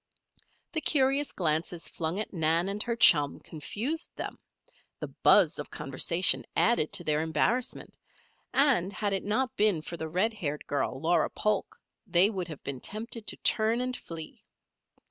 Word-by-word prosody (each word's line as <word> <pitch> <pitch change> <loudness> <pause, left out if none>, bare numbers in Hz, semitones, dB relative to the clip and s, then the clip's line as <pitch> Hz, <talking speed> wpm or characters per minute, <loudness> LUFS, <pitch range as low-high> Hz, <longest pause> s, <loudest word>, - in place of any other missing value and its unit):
The 315 - 0
curious 275 -1 +2
glances 165 0 -1
flung 165 +4 -3
at 215 - -5
Nan 165 +1 +1
and 205 +1 -2
her 235 0 -1
chum 145 -10 +5
confused 235 - -4
them, - - -6 0.6
the - - -5
buzz - - +4
of - - -6
conversation 175 +1 +2
added 230 -10 +3
to - - -3
their 150 0 +1
embarrassment, 230 +10 -1 0.6
and 260 -10 +3
had 205 0 -2
it 195 - -1
not 255 +5 -1
been 205 -8 +2
for 170 - -7
the 160 0 -5
red 190 +7 +1
haired 150 -8 -4
girl, 135 -2 -2
Laura 170 +4 +2
Polk, 215 - -2 0.3
they 185 +4 +4
would 185 -4 -4
have 155 -4 -9
been 135 -2 -5
tempted 220 - -6
to - - -4
turn 220 +2 +2
and 250 0 -2
flee. 165 -7 -8
190 Hz, 160 wpm, -29 LUFS, 160-230 Hz, 0.6 s, chum